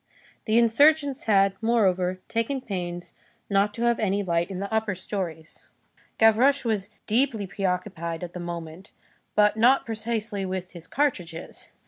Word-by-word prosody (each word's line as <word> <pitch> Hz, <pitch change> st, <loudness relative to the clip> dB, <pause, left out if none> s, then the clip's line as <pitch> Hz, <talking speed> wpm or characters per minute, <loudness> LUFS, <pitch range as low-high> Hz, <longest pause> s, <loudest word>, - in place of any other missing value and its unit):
The 220 Hz, 0 st, +2 dB
insurgents 285 Hz, +4 st, +3 dB
had, 195 Hz, -2 st, +4 dB
moreover, 185 Hz, -5 st, +1 dB
taken 230 Hz, +4 st, -1 dB
pains 175 Hz, -6 st, -5 dB, 0.4 s
not 200 Hz, +1 st, +3 dB
to 235 Hz, -, -3 dB
have 235 Hz, -1 st, +2 dB
any 205 Hz, -1 st, 0 dB
light 170 Hz, -1 st, 0 dB
in 190 Hz, -, -5 dB
the 200 Hz, +2 st, -4 dB
upper 220 Hz, -3 st, 0 dB
stories. 175 Hz, -4 st, -6 dB, 0.5 s
Gavroche 245 Hz, +5 st, +4 dB
was 210 Hz, -3 st, -1 dB, 0.2 s
deeply 230 Hz, -2 st, +1 dB
preoccupied 180 Hz, -3 st, -3 dB
at 175 Hz, -1 st, -7 dB
that 180 Hz, -, -6 dB
moment, 170 Hz, +1 st, -7 dB, 0.5 s
but 210 Hz, 0 st, +4 dB
not 250 Hz, +5 st, +4 dB
precisely 220 Hz, -2 st, -3 dB
with 185 Hz, -1 st, -4 dB
his 170 Hz, -2 st, -12 dB
cartridges. 180 Hz, -, -3 dB
200 Hz, 140 wpm, -25 LUFS, 180-230 Hz, 0.5 s, had